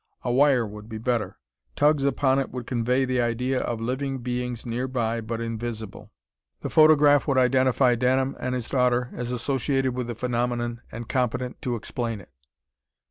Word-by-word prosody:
A 120 - -1
wire 130 -2 +4
would 105 +1 -10
be 110 - -5
better. 115 0 -1 0.4
Tugs 145 -1 +3
upon 135 -1 +2
it 135 - -2
would 125 -2 -6
convey 125 +2 +1
the 130 -1 0
idea 125 +2 0
of 115 -2 -3
living 130 +4 -2
beings 125 -1 -4
nearby 120 -1 -2
but 115 +1 -4
invisible. 110 -2 -5 0.5
The - - -4
photograph 150 -2 +6
would 140 -2 +1
identify 130 0 +3
Denham 130 +3 +1
and 125 0 -2
his 125 -3 -3
daughter 125 -2 +1
as 120 0 -4
associated 130 +1 0
with 125 -1 -3
the 120 - -4
phenomenon 120 0 -2
and 115 0 -7
competent 125 0 -2
to 125 -5 -2
explain 115 0 -4
it.... 85 -7 -16
125 Hz, 165 wpm, -25 LUFS, 115-130 Hz, 0.5 s, photograph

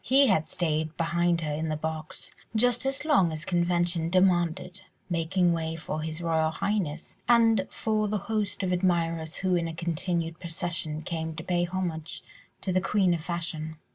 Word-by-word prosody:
He 275 +3 +5
had 160 - +3
stayed 160 -1 -1
beside 170 0 +1
her 150 -2 -2
in 160 +2 -2
the 155 - 0
box 155 0 -5 0.2
just 245 +3 +2
as 270 +2 -2
long 195 - +4
as 155 0 -5
convention 175 -1 +1
demanded, 180 0 +2 0.3
making 175 +1 +2
way 160 -1 -2
for 155 -1 -4
His 160 +1 -4
Royal 160 -2 +2
Highness, 175 -3 -2
and 225 -4 +5
for 215 -1 0
the 210 +1 0
host 205 0 -2
of 185 - 0
admirers 170 -3 0
who 185 -1 0
in 170 -1 0
a 165 - -5
continued 170 0 -2
procession 165 -3 -4
came 160 -1 -3
to 160 - -6
pay 175 0 +1
homage 170 -4 -4 0.4
to 190 - -1
the 185 - +3
queen 195 -2 +3
of 165 -2 -3
fashion. 165 -2 -4
170 Hz, 170 wpm, -28 LUFS, 160-185 Hz, 0.4 s, He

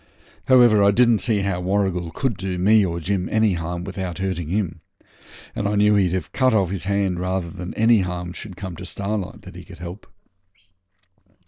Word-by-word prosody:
However, 120 -4 +6
I 100 - +5
didn't 115 +1 +4
see 110 -4 0
how 95 -2 -1
Warrigal 95 -2 0
could 115 +7 -2
do 95 0 -4
me 105 +4 +4
or 85 -2 -2
Jim 90 +1 -2
any 110 -2 +3
harm 85 +1 -4
without 95 -2 -5
hurting 95 -4 -3
him, 90 -4 -2 0.7
and 100 - -1
I 105 - 0
knew 105 +1 +4
he'd 95 -4 +2
have 95 - -3
cut 130 -3 +3
off 95 -4 +1
his 95 -2 -4
hand 100 -2 0
rather 90 -1 -2
than 90 +2 -7
any 115 0 +4
harm 90 -1 -4
should 95 -2 -8
come 95 -3 -6
to - - -8
Starlight 100 -1 -4
that - - -11
he - - -9
could - - -13
help. 90 +4 -9
95 Hz, 195 wpm, -22 LUFS, 90-105 Hz, 0.7 s, However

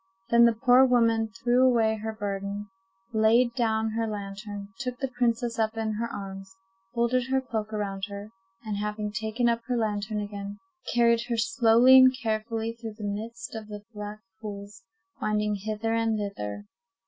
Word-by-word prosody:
Then 235 0 +7
the 235 - +5
poor 250 +2 +6
woman 230 -3 +3
threw 240 +3 +1
away 225 -4 +3
her 220 +1 -4
burden, 200 -1 -4 0.4
laid 230 +2 +4
down 220 -3 0
her 225 +1 -1
lantern, 205 0 -6
took 250 -2 -3
the 270 - -2
princess 235 -1 0
up 220 0 0
in 220 -1 -1
her 230 +2 -2
arms, 195 -1 -7 0.4
folded 245 +1 +1
her 265 0 +2
cloak 220 -5 -4
around 200 -2 -3
her, 200 +1 -8 0.3
and 210 -2 -2
having 210 0 -3
taken 220 +3 -1
up 235 0 +1
her 250 -1 0
lantern 215 -1 -1
again, 205 0 -6 0.4
carried 235 -1 +4
her 235 -2 -1
slowly 230 +2 +6
and 260 0 +7
carefully 225 0 -2
through 225 -2 -8
the 215 - -8
midst 225 +3 -5
of 220 -2 -6
the 210 -1 -8
black 210 0 -7 0.2
pools, 200 -2 -8 0.4
winding 210 0 +1
hither 215 +2 -2
and 225 -1 +1
thither. 105 - -5
220 Hz, 165 wpm, -27 LUFS, 210-235 Hz, 0.4 s, Then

